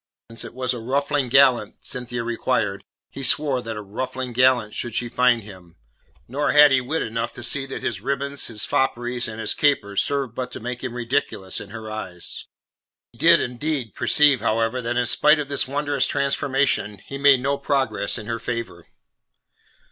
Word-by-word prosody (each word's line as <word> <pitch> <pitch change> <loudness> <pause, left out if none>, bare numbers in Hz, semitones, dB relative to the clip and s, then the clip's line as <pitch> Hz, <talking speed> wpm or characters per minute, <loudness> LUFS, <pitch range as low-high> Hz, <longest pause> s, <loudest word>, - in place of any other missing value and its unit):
Since 115 - -5
it - - -10
was 130 -1 -1
a 120 - -5
ruffling 140 +2 -1
gallant 125 -5 +3
Cynthia 120 -1 -4
required, 115 -4 -1 0.3
he 140 - -8
swore 135 0 +1
that 115 -2 -6
a 105 - -6
ruffling 125 +4 -5
gallant 125 -3 +3
should 120 -2 -4
she 120 - -1
find 125 -1 +2
him; 90 -5 -14 0.5
nor 140 +5 0
had 150 -1 +8
he 135 -1 +4
wit 150 +6 -2
enough 115 +1 -3
to 120 - -9
see 135 +3 +1
that 135 - -6
his 100 -5 -2
ribbons, 140 +2 -2
his 110 -1 -3
fopperies, 120 -1 0
and 110 0 -7
his 110 - 0
capers 100 -9 +1
served 140 -5 -1
but 125 0 -5
to - - -6
make 125 +2 -6
him 125 -2 -4
ridiculous 120 -6 -2
in 100 - -10
her 110 0 -8
eyes. 95 -5 -5 0.6
He - - -22
did - - +6
indeed 125 -2 -3
perceive, 145 -3 +4
however, 115 +3 0
that 120 0 -2
in 125 - +2
spite 150 +5 +4
of 145 -2 -4
this 140 -1 +1
wondrous 145 +2 0
transformation, 135 -6 +1
he 140 - -7
made 140 -2 +6
no 140 +2 -1
progress 135 -7 -1
in 110 - -7
her 115 0 -3
favour. 115 -7 -5
125 Hz, 185 wpm, -23 LUFS, 115-140 Hz, 0.6 s, had